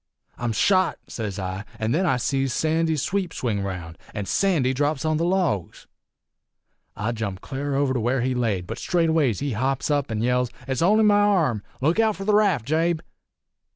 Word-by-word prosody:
"'I'm 120 -1 -1
shot!' 185 - +2
sez 105 -5 -5
I; 95 +1 -4
an' 110 +1 -1
then 175 +6 +2
I 135 - +2
sees 135 +1 0
Sandy's 160 -2 +1
sweep 190 -3 -1
swing 110 -5 -1
round, 90 -4 -6 0.2
an' 105 -2 -3
Sandy 155 - +1
drops 145 +2 0
on 155 -1 +1
the 165 - 0
logs. 170 - -1 1.1
"I 110 +3 -2
jumped 105 -5 -4
cl'ar 140 +1 -3
over 140 -1 +1
to 125 - 0
where 120 +3 0
he 130 +1 0
laid, 110 -7 -1
but 115 +6 -6
straightways 160 - +1
he 145 -1 -1
hops 130 +5 -1
up 145 -1 +1
an' 110 0 -2
yells, 125 0 +1 0.2
'It's 130 -2 -1
only 210 +6 +4
me 210 -1 +5
arm! 190 - +3 0.2
Look 160 +9 +2
out 220 -2 +3
for 195 - -6
the 210 - +2
raft, 200 - +3
Jabe!' 160 +2 +1
135 Hz, 190 wpm, -24 LUFS, 115-165 Hz, 1.1 s, me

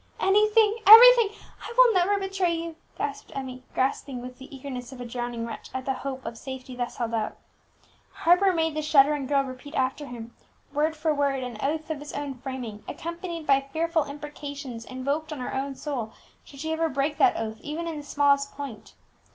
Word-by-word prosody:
"Anything 425 +2 +4
everything 470 0 +10 0.3
I - - -7
will - - +7
never 380 +2 +3
betray 385 -3 0
you!" 330 0 -5 0.2
gasped 280 -1 -4
Emmie, 260 -2 -5
grasping 265 0 -1
with 250 +1 -9
the 265 - -9
eagerness 260 -2 -7
of 260 - -10
a 245 - -5
drowning 240 -1 -4
wretch 230 - -8
at 260 0 -3
the 270 - 0
hope 265 0 -6
of 230 0 -6
safety 260 -1 -7
thus 245 -1 -4
held 230 -2 -2
out. 220 -2 -2 0.7
Harper 360 +3 +4
made 325 -2 0
the 310 - -2
shuddering 290 -2 +4
girl 280 0 +2
repeat 260 +3 -9
after 265 +3 -1
him, 235 -2 -8 0.4
word 305 +2 +1
for 310 0 0
word, 280 -2 0
an 245 -4 -6
oath 310 +2 -2
of 305 - -3
his 295 0 -9
own 285 -1 -3
framing, 250 -5 -7
accompanied 335 -1 -5
by 275 -1 +4
fearful 325 0 +1
imprecations 285 -4 -7
invoked 280 +5 -3
on 300 - -5
her 250 - -4
own 270 +1 -2
soul 255 -7 -4 0.3
should 275 -1 -12
she 320 +1 -2
ever 325 0 0
break 280 +1 -1
that 380 -2 +5
oath, 220 -1 -4
even 320 +3 -4
in 325 -2 -4
the 295 - -7
smallest 280 -1 +2
point. 270 -7 -8
280 Hz, 190 wpm, -26 LUFS, 255-320 Hz, 0.7 s, everything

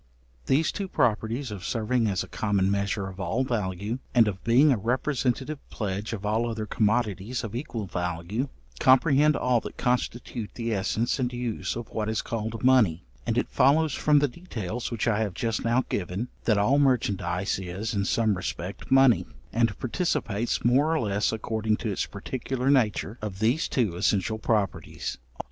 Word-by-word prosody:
These 155 +4 +3
two 200 - -4
properties 115 - 0
of 100 -3 -7
serving 115 0 0
as 95 -3 0
a - - -10
common 100 -3 0
measure 100 0 -1
of 95 0 -9
all 95 +7 0
value, 105 -1 -2 0.2
and 115 -3 +6
of 95 -3 -4
being 130 +6 +5
a - - +4
representative 130 +5 -1
pledge 105 0 -3
of 105 -3 -5
all 110 +3 +1
other 110 -1 -3
commodities 110 +1 0
of 110 -2 -5
equal 120 -5 -4
value, 90 - -3 0.3
comprehend 145 +3 +5
all 125 -2 +2
that - - -9
constitute 125 -2 -1
the 115 -1 -2
essence 110 +6 0
and 125 -1 0
use 120 -2 -3
of 120 -1 -6
what 110 -1 -2
is 110 - -1
called 115 0 -4
money; 115 - +4 0.2
and - - 0
it - - +1
follows 145 +3 +4
from 150 -1 +3
the 145 0 +4
details 120 - -5
which 115 -1 -2
I 110 -2 +2
have 105 -5 -1
just 115 0 -1
now 120 +3 +2
given, 95 +6 -3 0.2
that 110 -3 +3
all 125 +8 +3
merchandize 105 -8 +1
is, 95 +5 -4
in 100 -1 0
some 110 -1 +2
respect, 95 0 -5
money; 135 -3 +5 0.3
and 115 -3 +2
participates 120 - -1
more 140 +7 +4
or - - +1
less, 100 -1 +1
according 110 -1 -1
to 110 -2 -3
its 95 - -2
particular 130 +5 -2
nature, 115 -3 +1
of 105 -3 -5
these 115 +9 +1
two 110 -10 0
essential 100 +3 +1
properties. 105 -4 -2
115 Hz, 170 wpm, -27 LUFS, 100-125 Hz, 0.3 s, and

